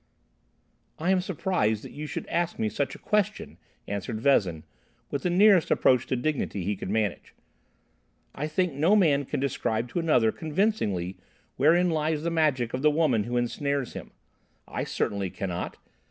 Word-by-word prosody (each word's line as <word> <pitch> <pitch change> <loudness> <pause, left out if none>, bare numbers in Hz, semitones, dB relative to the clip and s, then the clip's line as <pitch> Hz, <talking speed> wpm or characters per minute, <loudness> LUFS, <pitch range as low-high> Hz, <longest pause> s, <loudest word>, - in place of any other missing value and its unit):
"I 175 +4 0
am 190 -1 +3
surprised 175 - -1
that - - -9
you 150 +1 -6
should - - -5
ask 170 0 -1
me 110 - 0
such 140 +4 -2
a - - -9
question," 210 0 -1 0.3
answered 100 +2 -4
Vezin, 95 - +2 0.5
with 140 - -2
the 180 - 0
nearest 190 -1 +5
approach 125 -1 +3
to - - 0
dignity 125 - -2
he 100 +3 -1
could 95 - -6
manage. 105 -3 -2 1.0
"I 150 +3 -3
think 170 +1 0
no 160 +9 +3
man 145 -8 +3
can - - -3
describe 120 -3 -1
to 175 - -2
another 125 -9 +3
convincingly 150 - -1 0.4
wherein 170 +6 +4
lies 155 -1 0
the 170 - -1
magic 145 -8 +1
of 130 - -2
the 150 - +5
woman 145 -9 +2
who 120 +1 -2
ensnares 140 +2 -1
him. - - -8 0.6
I - - -3
certainly 100 -2 -2
cannot. 90 -1 -4
140 Hz, 165 wpm, -27 LUFS, 110-165 Hz, 1.0 s, nearest